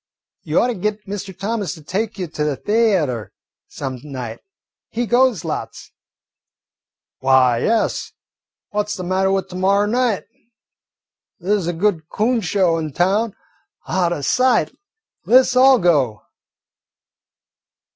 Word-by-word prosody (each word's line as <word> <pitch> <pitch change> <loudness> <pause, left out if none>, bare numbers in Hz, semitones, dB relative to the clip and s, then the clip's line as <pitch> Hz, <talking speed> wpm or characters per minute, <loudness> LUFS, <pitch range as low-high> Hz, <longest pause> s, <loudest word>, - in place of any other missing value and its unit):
"You - - +1
ought 250 - +2
to - - 0
git 210 +1 -3
Mr. 195 -1 -6
Thomas 200 -3 -2
to 155 - -14
take 205 +7 -3
you 185 - -2
to 155 -2 -4
the 150 -3 -1
th'atre 190 - +1 0.4
some 130 -2 -6
night. 125 -6 -6 0.5
He 240 +2 -2
goes 240 - +2
lots." - - -5 1.3
"Why, 130 -2 +4
yes, 225 - 0 0.6
what 210 0 -1
's - - -2
the 185 - -6
matter 190 +2 +1
with 195 -1 0
to 180 - -9
morrer 195 +2 +2
night? 235 -1 0 1.2
There 190 +4 +1
's 190 -5 -2
a 175 - -1
good 170 -3 0
coon 230 +2 +1
show 180 -3 +1
in 155 -3 -5
town. 195 - +1 0.5
Out 180 -2 +1
o' 175 - -2
sight. 255 - +2 0.5
Let 255 +2 +7
's 255 - -2
all 260 +1 +7
go." 140 - +1
190 Hz, 140 wpm, -20 LUFS, 160-215 Hz, 1.3 s, Let